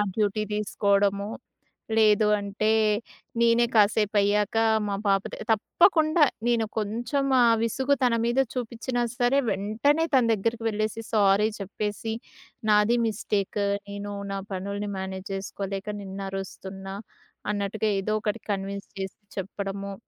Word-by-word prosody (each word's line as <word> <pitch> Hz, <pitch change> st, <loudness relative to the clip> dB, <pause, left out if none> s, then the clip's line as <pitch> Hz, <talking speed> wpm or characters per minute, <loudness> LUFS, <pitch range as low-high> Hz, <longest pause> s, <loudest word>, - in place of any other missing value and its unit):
Duty 215 Hz, 0 st, +1 dB
తీసుకోవడము. 200 Hz, -1 st, +1 dB, 0.7 s
లేదు 215 Hz, -1 st, +5 dB
అంటే 200 Hz, +2 st, -1 dB, 0.7 s
నేనే 235 Hz, 0 st, +4 dB
కాసేపయ్యాక 210 Hz, 0 st, +3 dB, 0.3 s
మా 200 Hz, -, -1 dB
పాప 195 Hz, -1 st, +3 dB
త -, -, -3 dB, 0.2 s
తప్పకుండా 310 Hz, -, +4 dB, 0.2 s
నేను 235 Hz, -2 st, +2 dB
కొంచెం 235 Hz, +6 st, -1 dB, 0.2 s
ఆ 240 Hz, -, +6 dB, 0.2 s
విసుగు 265 Hz, +5 st, +1 dB
తన 245 Hz, -, +3 dB
మీద 240 Hz, +3 st, +1 dB
చూపించినా 245 Hz, 0 st, -2 dB
సరే! 245 Hz, +3 st, +2 dB
వెంటనే 220 Hz, +11 st, +1 dB
తన 260 Hz, -2 st, +5 dB
దగ్గరికి 225 Hz, +3 st, -1 dB
వెళ్ళేసి, 215 Hz, +1 st, -1 dB
సారీ 205 Hz, 0 st, +4 dB
చెప్పేసి 210 Hz, +3 st, -3 dB, 0.6 s
నాది 210 Hz, +3 st, +4 dB
మిస్టేక్ 205 Hz, -1 st, -1 dB, 0.3 s
నేను 200 Hz, 0 st, -5 dB, 0.2 s
నా 195 Hz, -, -2 dB
పనుల్ని 200 Hz, +2 st, -3 dB
మేనేజ్ 190 Hz, 0 st, -5 dB
చేసుకోలేక 195 Hz, +1 st, -5 dB
నిన్నరుస్తున్నా. 195 Hz, 0 st, -6 dB, 0.6 s
అన్నట్టుగా 210 Hz, +1 st, -1 dB
ఏదో 215 Hz, +2 st, -1 dB
ఒకటి 215 Hz, 0 st, -2 dB
కన్విన్స్ 200 Hz, 0 st, -4 dB
చేసి 190 Hz, 0 st, -5 dB, 0.2 s
చెప్పడము. 195 Hz, +1 st, -4 dB
210 Hz, 115 wpm, -26 LUFS, 200-225 Hz, 0.7 s, ఆ